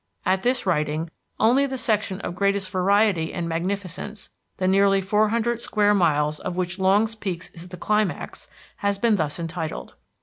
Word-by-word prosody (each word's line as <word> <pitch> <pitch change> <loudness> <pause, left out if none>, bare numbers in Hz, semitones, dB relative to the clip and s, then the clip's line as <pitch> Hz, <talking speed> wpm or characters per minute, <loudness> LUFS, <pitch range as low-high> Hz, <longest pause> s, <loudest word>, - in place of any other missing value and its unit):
At 190 0 +2
this 250 +1 +1
writing 155 -2 0 0.3
only 255 +6 +4
the 265 -1 -4
section 215 -5 -1
of - - -4
greatest 200 0 0
variety 190 -2 +2
and 170 - -3
magnificence, 190 +4 -4 0.3
the 185 - 0
nearly 195 +1 +4
four 210 +3 +2
hundred 235 +1 0
square 210 -2 +2
miles 150 -5 +2
of 180 - -4
which 180 0 -2
Longs 205 +4 +3
Peak 190 -6 -4
is 175 -1 -10
the 180 0 -9
climax, 210 +1 -1 0.3
has 200 -1 0
been 220 0 +2
thus 155 -4 -2
entitled. 165 -1 -5
195 Hz, 165 wpm, -24 LUFS, 175-210 Hz, 0.3 s, only